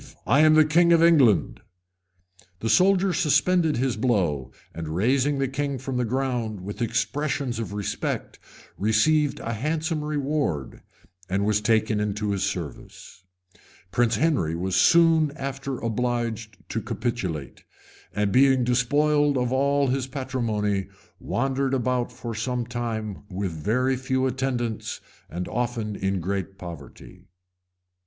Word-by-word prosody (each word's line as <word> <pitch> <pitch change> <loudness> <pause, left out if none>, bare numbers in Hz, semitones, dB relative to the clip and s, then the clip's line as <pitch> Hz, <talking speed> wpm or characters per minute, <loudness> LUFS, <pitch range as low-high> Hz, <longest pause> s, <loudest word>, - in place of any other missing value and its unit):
I 135 +6 +3
am 155 0 +6
the 155 0 +6
king 170 +3 +4
of 165 0 +5
England." 120 - +4 1.0
The 115 - -2
soldier 190 0 +4
suspended 170 -1 +2
his 130 -1 0
blow 90 - 0 0.2
and, 80 -1 -6
raising 130 +8 +2
the 135 0 0
king 140 +1 -2
from 130 0 -4
the 125 - +1
ground 120 -4 -2
with 100 +5 -7
expressions 120 +3 -1
of 110 -5 -4
respect, 100 -1 -4 0.4
received 140 +9 +2
a 115 - -3
handsome 155 +6 -2
reward, 145 - -2 0.5
and 100 +2 0
was 105 0 +2
taken 110 -1 +2
into 105 0 -1
his 100 -1 -1
service. 90 0 -6 0.7
Prince 120 +2 +2
Henry 135 - +1
was 90 +2 -2
soon 165 -3 +5
after 135 -2 -4
obliged 115 -2 -2
to - - -2
capitulate; 95 - -4 0.5
and 105 -1 0
being 130 +1 +4
despoiled 145 +4 +2
of 125 -1 0
all 140 +1 +2
his 130 0 -1
patrimony, 115 -7 -2 0.3
wandered 135 +1 -1
about 125 -1 -1
for 115 -1 -6
some 120 +2 -2
time 115 -4 -4
with 95 -1 -3
very 120 - 0
few 130 0 -1
attendants, 125 -3 -2 0.3
and 90 +2 -4
often 120 -3 -2
in 95 -1 -1
great 95 +1 -3
poverty. 85 -6 -10
{1091. 90 +1 -19
120 Hz, 135 wpm, -25 LUFS, 105-140 Hz, 1.0 s, am